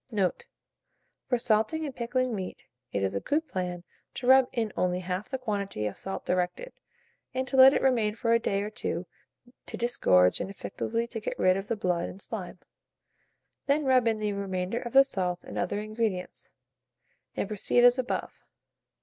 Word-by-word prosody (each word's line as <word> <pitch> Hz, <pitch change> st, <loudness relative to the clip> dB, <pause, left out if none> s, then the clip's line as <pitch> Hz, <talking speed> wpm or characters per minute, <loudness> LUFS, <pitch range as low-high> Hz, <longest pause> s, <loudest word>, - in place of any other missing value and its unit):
Note. 195 Hz, -5 st, 0 dB, 0.8 s
For 245 Hz, -, +3 dB
salting 235 Hz, +7 st, +1 dB
and 275 Hz, -4 st, -6 dB
pickling 250 Hz, +1 st, -1 dB
meat, 190 Hz, -3 st, -5 dB, 0.3 s
it 100 Hz, -, -1 dB
is 95 Hz, -, 0 dB
a 100 Hz, -, -1 dB
good 315 Hz, -, -1 dB
plan 180 Hz, -6 st, -4 dB, 0.3 s
to 245 Hz, -, -5 dB
rub 260 Hz, 0 st, +7 dB
in 225 Hz, -4 st, -2 dB
only 180 Hz, 0 st, 0 dB
half 185 Hz, +2 st, -4 dB
the 265 Hz, -, -2 dB
quantity 200 Hz, -, -3 dB
of 105 Hz, -, -3 dB
salt 195 Hz, -, -6 dB
directed, 180 Hz, -, -1 dB, 0.6 s
and 260 Hz, 0 st, -1 dB
to 270 Hz, -, -3 dB
let 265 Hz, 0 st, +9 dB
it -, -, 0 dB
remain 230 Hz, -5 st, +2 dB
for 230 Hz, 0 st, +1 dB
a 230 Hz, -, +4 dB
day 200 Hz, -3 st, -1 dB
or 210 Hz, -, -5 dB
two 185 Hz, -4 st, -3 dB, 0.6 s
to -, -, -5 dB
disgorge 90 Hz, -, +3 dB
and 190 Hz, -, -3 dB
effectually 230 Hz, +3 st, -3 dB
to 235 Hz, -1 st, -5 dB
get 215 Hz, -, -4 dB
rid 185 Hz, 0 st, +4 dB
of 195 Hz, +1 st, -4 dB
the 230 Hz, -, -1 dB
blood 180 Hz, -4 st, -1 dB
and 190 Hz, -, -10 dB
slime; 195 Hz, -4 st, -5 dB, 1.1 s
then 290 Hz, +1 st, +2 dB
rub 255 Hz, -3 st, +4 dB
in 225 Hz, -1 st, +2 dB
the 210 Hz, -1 st, -1 dB
remainder 195 Hz, +2 st, -2 dB
of 235 Hz, -, -7 dB
the 270 Hz, 0 st, +9 dB
salt 180 Hz, -9 st, -2 dB
and -, -, -6 dB
other 180 Hz, +3 st, -1 dB
ingredients, 215 Hz, -3 st, -3 dB, 0.9 s
and -, -, -2 dB
proceed 215 Hz, +3 st, +2 dB
as 245 Hz, +1 st, +6 dB
above. 250 Hz, -, -3 dB
215 Hz, 185 wpm, -28 LUFS, 185-245 Hz, 1.1 s, let